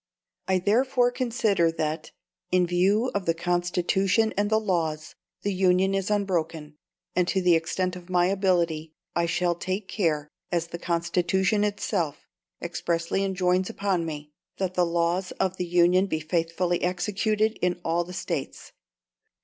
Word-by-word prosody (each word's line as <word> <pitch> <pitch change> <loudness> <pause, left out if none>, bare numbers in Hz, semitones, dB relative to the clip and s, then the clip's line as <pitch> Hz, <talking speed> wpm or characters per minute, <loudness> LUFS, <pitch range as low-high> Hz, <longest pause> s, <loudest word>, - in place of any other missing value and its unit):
"I 190 - +3
therefore 245 +6 +2
consider 230 -9 +1
that, 155 0 -3 0.4
in 180 -1 +4
view 195 +8 +2
of 200 -3 -2
the 165 - +2
Constitution 180 +5 +1
and 205 +1 +1
the 220 0 +3
laws, 160 -7 -2 0.3
the 205 - 0
Union 185 +1 +3
is 195 0 -1
unbroken; 165 -7 -1 0.4
and 180 -1 +2
to 190 - +1
the 180 -2 +4
extent 180 +3 0
of 180 0 -11
my 175 -1 +3
ability, 170 -5 0 0.2
I 170 0 +2
shall 175 +1 +1
take 185 +3 -4
care, 155 -8 0 0.2
as 170 -1 -1
the 170 - -6
Constitution 180 +4 +1
itself 200 -7 -2 0.4
expressly 170 +2 -1
enjoins 185 -1 +1
upon 195 -4 -1
me, 150 -2 -6 0.3
that 185 -2 -2
the 180 -1 +2
laws 170 +2 0
of 190 -1 -1
the 180 - -2
Union 175 +2 +4
be 160 -4 -1
faithfully 165 +2 -1
executed 210 +4 0
in 180 0 0
all 170 +1 +1
the 175 - -10
States. 175 -5 -5
180 Hz, 150 wpm, -26 LUFS, 170-195 Hz, 0.4 s, in